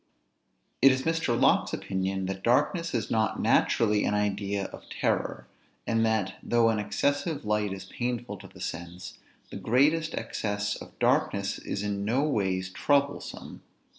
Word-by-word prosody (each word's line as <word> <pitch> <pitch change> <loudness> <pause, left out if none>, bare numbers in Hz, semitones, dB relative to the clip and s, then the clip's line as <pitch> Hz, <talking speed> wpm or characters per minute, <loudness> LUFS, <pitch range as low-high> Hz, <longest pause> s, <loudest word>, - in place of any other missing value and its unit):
It 135 +2 +8
is 130 0 0
Mr. 165 -8 0
Locke's - - +3
opinion, 95 0 -2
that 95 0 -4
darkness 160 - +1
is 115 - -2
not 110 -1 +1
naturally 105 -2 +3
an 105 - +1
idea 100 -1 -1
of - - -12
terror; - - -1 0.4
and 115 0 +1
that, 110 -4 0
though 120 -1 +3
an 110 -1 +1
excessive 145 +7 -1
light 105 -1 0
is 95 -1 -6
painful 120 0 -3
to 95 +1 -12
the - - -15
sense, 85 +2 -6 0.3
the - - -5
greatest 155 +7 +2
excess 100 -1 -2
of - - -11
darkness - - +1
is 100 - -4
no 105 +6 0
ways 95 -9 0
troublesome. 140 +5 -1
105 Hz, 145 wpm, -28 LUFS, 100-130 Hz, 0.4 s, It